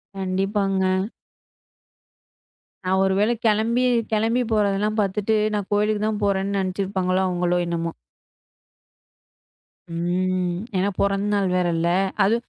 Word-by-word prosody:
கண்டிப்பாங்க. 190 0 0 1.8
நான் 190 +1 +2
ஒருவேளை 195 +4 +2
கிளம்பி 225 +3 +2 0.3
கிளம்பி 225 +3 +1
போறது 205 -2 +2
எல்லாம் 215 +1 0
பாத்துட்டு 205 +2 0 0.2
நான் 205 -2 -2
கோயிலுக்குத் 210 +1 +1
தான் 215 -1 -2
போறேன்னு 200 0 0
நினைச்சுருப்பாங்களா? 185 -1 -1
அவங்களோ 180 -1 0
என்னமோ. 170 -1 -2 2.0
ம். 180 +1 0 0.2
ஏன்னா 190 +2 +1
பொறந்த 200 0 +1
நாள் 200 -2 +1
வேற 180 -1 +2
இல்ல. 170 +1 +1 0.3
அது 205 +4 +3
195 Hz, 105 wpm, -23 LUFS, 185-210 Hz, 2.0 s, அது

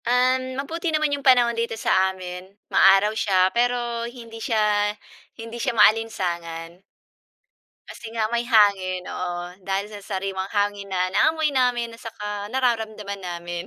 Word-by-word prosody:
Uhm, 255 +2 +1
mabuti 330 +5 -3
naman 310 -2 +1
yung 285 - -2
panahon 250 -3 +5
dito 230 -1 -2
sa 190 -3 +2
amin, 185 0 -8 0.2
ma-araw 195 +2 +5
siya 190 -4 +2
pero 240 -1 0
hindi 230 -2 -11
siya 210 -2 +1 0.5
hindi 230 +1 -7
siya 230 - -1
maalinsangan. 175 -6 +1 1.1
Kasi - - -10
nga 220 -2 0
may 235 0 0
hangin, 200 -6 +3
oo. 175 -1 -4 0.3
Dahil 195 +1 0
sa 210 -1 -9
sariwang 190 -1 -3
hangin 205 -1 -1
na 185 -1 0
naamoy 315 -1 +3
namin 245 -2 +1
at 230 - -17
saka 210 -2 -5
nararamdaman 220 -6 -1
namin. 175 -1 -5
215 Hz, 140 wpm, -23 LUFS, 190-240 Hz, 1.1 s, panahon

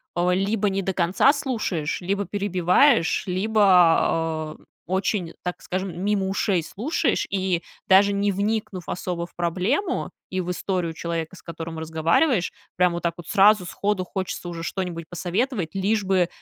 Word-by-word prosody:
э, 175 +1 +2
либо 200 +3 +1
не 195 0 -1
до 190 0 -2
конца 185 +10 +3
слушаешь, 215 - -2
либо 200 +3 -1
перебиваешь, 195 - +3
либо, 180 -5 +3
э, - - -22 0.2
очень, 190 -1 -1
так 180 0 -4
скажем, 185 0 -4
мимо 200 -2 +1
ушей 195 -1 +1
слушаешь. 220 - -1
И 185 -3 0 0.2
даже 195 +1 +6
не 200 0 +1
вникнув 200 -2 -2
особо 175 -1 -3
в 175 - -19
проблему 190 - -1 0.2
и 185 0 -1
в 180 0 -3
историю 180 -2 -2
человека, 165 +1 -4
с - - -14
которым 165 -1 -7
разговариваешь, 165 - +1 0.2
прям 180 0 +3
вот 170 - -4
так 170 -1 0
вот 175 - -10
сразу 205 -2 +5
сходу 200 +1 -1
хочется 185 -1 -4
уже 170 -1 -6
что-нибудь 170 -2 -4
посоветовать, 185 - -2
лишь 205 +2 +1
бы, 190 -2 +2
185 Hz, 155 wpm, -24 LUFS, 170-200 Hz, 0.2 s, даже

